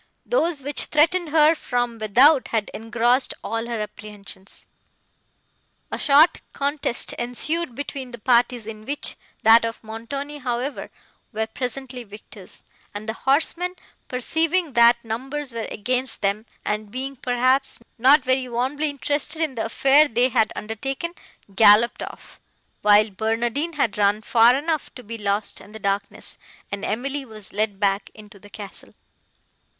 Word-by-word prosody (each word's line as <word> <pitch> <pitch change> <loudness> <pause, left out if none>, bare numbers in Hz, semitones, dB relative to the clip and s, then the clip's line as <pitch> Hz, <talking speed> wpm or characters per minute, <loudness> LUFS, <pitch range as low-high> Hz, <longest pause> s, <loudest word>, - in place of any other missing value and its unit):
Those, 335 - 0
which 290 +1 +2
threatened 330 +3 +2
her 310 +1 +5
from 245 -6 -2
without, 255 +7 +5
had 220 -3 -2
engrossed 240 +3 +1
all 225 +1 -3
her 235 -2 -3
apprehensions. 205 -2 -9 1.3
A - - -3
short 305 +3 +5
contest 280 -3 0
ensued 245 +4 -1
between 275 -1 -5
the 240 - -9
parties, 240 0 +2
in 215 -1 -8
which 285 +3 -1 0.3
that 225 +1 +7
of 230 0 -4
Montoni, 275 +7 -6
however, 250 +2 -3 0.4
were 220 -1 -1
presently 250 +2 -5
victors, 205 -2 -10 0.3
and 210 +1 -6
the 220 - -1
horsemen, 330 +8 +1 0.3
perceiving 320 +5 0
that 235 0 +5
numbers 265 +4 -4
were 230 -1 -4
against 255 +4 -1
them, 205 +3 0 0.2
and 210 0 -2
being, 265 +4 -4
perhaps, 255 +2 +1 0.2
not 270 +4 +6
very 260 0 0
warmly 265 +6 -1
interested 290 +2 -2
in 315 -4 0
the 230 - -3
affair 275 +6 +4
they 245 0 +2
had 220 -3 +2
undertaken, 270 +10 -4 0.4
galloped 220 +3 +5
off, - - -9 0.4
while 210 +1 +5
Barnardine 235 - -1
had 230 -8 -1
run 205 +1 +2
far 235 +2 +5
enough 310 +2 -2
to 250 - -10
be 230 +1 -7
lost 205 0 -1
in 205 - -15
the - - -7
darkness, 200 0 -3 0.3
and 200 0 -4
Emily 270 +6 -2
was 215 -5 -11
led 210 -1 -1
back 200 0 0
into 210 -1 -14
the 205 - -15
castle. 205 -1 -9
240 Hz, 145 wpm, -23 LUFS, 220-280 Hz, 1.3 s, that